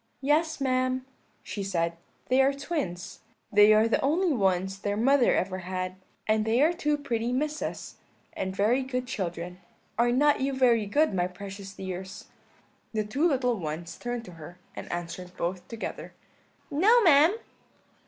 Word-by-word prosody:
"'Yes, 305 +4 +1
ma'am,' 255 -1 0 0.4
she 205 - -5
said, 170 -4 -1 0.3
'they 260 +1 +4
are 270 +1 +3
twins; 275 - -4 0.3
they 210 +1 +7
are 215 +1 +5
the 230 - +1
only 325 +4 +2
ones 190 -3 0
their 205 0 -2
mother 265 +3 +4
ever 185 0 -1
had, 185 0 -4 0.3
and 215 0 +2
they 225 +3 +1
are 325 +3 +4
two 300 -4 0
pretty 240 -4 -2
Misses, 300 +4 -3 0.4
and 190 0 -4
very 220 +7 +2
good 255 -1 -3
children. 180 -6 -4 0.4
Are 240 0 +4
not 290 +3 +3
you 275 +1 0
very 240 -5 +3
good, 295 +5 +2
my 180 -1 +1
precious 195 +1 -9
dears?' 190 0 -7 0.7
"The 215 -1 0
two 270 +11 +1
little 250 - +1
ones 165 +1 -5
turned 240 -1 -5
to 180 - -10
her; 170 +4 -10 0.2
and - - -7
answered 175 +1 -6
both 180 +1 -3
together: 230 -1 -6 0.6
"'No, 420 +12 +5
ma'am.' 325 +2 +6
230 Hz, 155 wpm, -27 LUFS, 190-275 Hz, 0.7 s, they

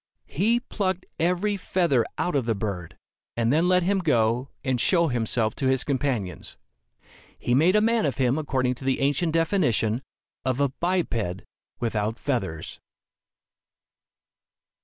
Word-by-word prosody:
He 220 +9 +1
plucked 190 -6 -2
every 180 +5 +1
feather 170 -10 +1
out 180 - -1
of 130 -4 0
the 115 - +1
bird, 100 -5 -5 0.4
and 115 +2 +2
then 165 +4 +3
let 180 0 +4
him 195 +2 +1
go 125 -5 +1
and 130 -4 0
show 170 -3 +3
himself 115 -2 0
to 135 - 0
his 130 -1 +2
companions. 130 -9 -2 0.8
He 120 - -1
made 165 +9 +4
a 210 - +5
man 230 -4 +2
of 130 - -3
him 130 +2 +2
according 130 -4 0
to - - -7
the 135 0 0
ancient 145 +5 +1
definition 150 - +1 0.4
of 130 0 -1
a 140 -1 +3
"biped 130 - -1 0.4
without 110 -1 -1
feathers." 115 - -3
135 Hz, 140 wpm, -25 LUFS, 115-175 Hz, 0.8 s, a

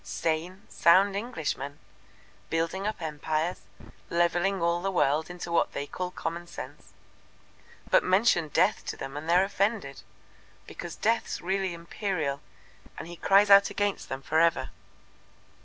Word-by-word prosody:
Sane, 170 +4 -3
sound 195 +4 +4
Englishmen! 160 - -4 0.7
building 165 +5 -1
up 215 -5 -4
empires, 155 +2 -2 0.5
levelling 175 +3 +1
all 170 0 +1
the 195 - -1
world 155 -2 +1
into 175 -1 -7
what 170 - +1
they 140 - -3
call 180 +5 -4
common 170 0 -5
sense. - - -10 0.9
But - - +4
mention 185 -3 +3
Death 150 - +2
to - - -4
them 135 - -7
and 155 +3 -6
they're 180 +2 +5
offended, 195 - -1 0.6
because 175 - -8
Death's 230 +2 0
really 190 0 -1
Imperial, 170 -5 -3 0.6
and - - -7
He 175 - -8
cries 200 +3 +4
out 200 0 +8
against 205 -1 -2
them 135 0 -5
for 160 - +1
ever." 165 0 +2
175 Hz, 140 wpm, -28 LUFS, 160-195 Hz, 0.9 s, out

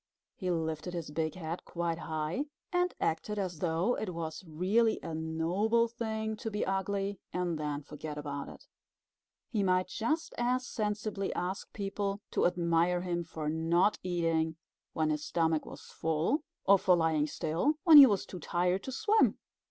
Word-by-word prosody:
He 185 - -3
lifted 160 0 -2
his 165 -3 -5
big 160 +2 -1
head 170 -1 -5
quite 170 -1 -2
high, 160 - -2 0.3
and 355 0 +2
acted 190 +6 -1
as 185 -5 -3
though 175 +8 +1
it 185 -5 -4
was 160 +1 -5
really 200 +8 +2
a 165 - -5
noble 170 +9 +1
thing 220 -2 -3
to 225 - -4
be 210 -1 -1
ugly 195 0 -1
and 180 -2 -1
then 150 -1 -3
forget 150 +1 -7
about 145 -1 -5
it. - - -13 0.9
He 215 -4 +1
might 185 -1 +2
just 310 - -1
as 250 +1 +1
sensibly 210 -3 -2
ask 185 +2 -3
people 200 0 -3
to - - +3
admire 175 0 +2
him 175 -1 -2
for 160 -2 -6
not 165 +6 +2
eating 165 -3 0 0.4
when 155 -1 +1
his 150 0 -2
stomach 160 -2 0
was - - -9
full, 160 - 0 0.2
or 195 0 +6
for 180 -1 +4
lying 160 -3 +2
still 165 - 0
when 325 -5 +9
he 280 -2 +12
was 200 -4 0
too 180 - -8
tired 180 +3 0
to 265 - -4
swim. 435 - +3
180 Hz, 165 wpm, -31 LUFS, 160-210 Hz, 0.9 s, he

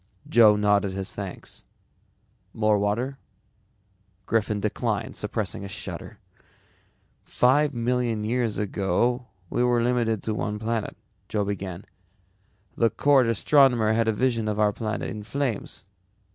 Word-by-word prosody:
Joe 110 -3 +6
nodded 105 -2 +2
his 95 0 -4
thanks. 100 -3 -7 0.9
"More 105 -1 +2
water?" 120 +7 -1 1.1
Griffin 105 -1 0
declined, 105 +1 -2
suppressing - - -4
a - - -5
shudder. 100 - -8 1.1
"Five 140 +3 +2
million 120 -2 0
years 115 0 -1
ago 105 +5 0 0.2
we 120 - +1
were 120 -1 +2
limited 115 -4 0
to 110 - -2
one 105 0 -2
planet," 110 0 -3 0.3
Joe 105 -2 0
began. 95 -2 -5 0.9
"The 115 - +3
court 135 -2 +3
astronomer 115 -1 +4
had 115 0 +1
a - - +4
vision 115 -1 0
of 105 0 -1
our 105 -1 +3
planet 110 0 -3
in 105 - -6
flames. 125 0 -4
110 Hz, 125 wpm, -25 LUFS, 105-120 Hz, 1.1 s, Joe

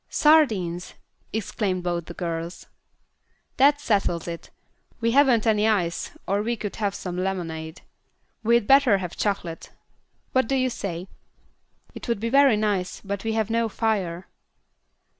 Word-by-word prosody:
"Sardines!" 210 - +2 0.4
exclaimed 200 -3 -2
both 175 -2 -2
the 170 - -8
girls. 170 0 -4 0.9
"That 285 +2 +5
settles 195 - 0
it. 170 -1 -7 0.5
We 230 0 +1
haven't 255 -4 +4
any 215 -1 +3
ice, 180 -6 0 0.2
or 200 +2 +1
we 235 +3 -1
could 210 -3 -6
have 205 -2 -1
some 180 -2 -5
lemonade. 165 -4 -4 0.6
We'd 235 0 +3
better 270 -4 +5
have 180 -3 -5
chocolate. 185 -5 -3 0.6
What 260 -3 +2
do 270 - 0
you 255 -1 +1
say?" 185 -5 -5 0.9
"It - - -9
would 235 -4 0
be 230 +2 -2
very 275 -3 +5
nice, 205 -4 -1
but 200 0 -4
we 225 0 -1
have 220 -1 0
no 230 0 +1
fire." 195 -6 -1
205 Hz, 140 wpm, -24 LUFS, 180-230 Hz, 0.9 s, That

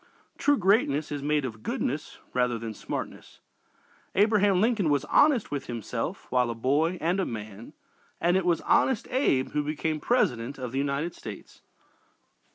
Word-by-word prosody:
True 290 0 +3
greatness 180 - +2
is 145 -1 -3
made 150 0 +1
of 110 -3 -6
goodness - - -3 0.2
rather 125 -1 +1
than 115 -1 -5
smartness. - - -7 0.8
Abraham 205 -2 +4
Lincoln 215 -5 +2
was 145 -2 +1
honest 280 -7 +3
with 140 -2 -4
himself 115 -3 -4
while 125 -1 +2
a 115 - -3
boy 145 +9 +1
and 175 +5 0
a - - +2
man, 110 -1 -8 0.5
and 175 +1 +2
it 190 - +2
was 170 -2 +1
"Honest 260 -5 +2
Abe" 195 - +2
who 150 0 0
became 155 +1 -2
President 135 - 0
of 125 -3 -5
the 135 - -1
United 145 +4 -1
States. 105 -3 -10
150 Hz, 160 wpm, -27 LUFS, 125-190 Hz, 0.8 s, Abraham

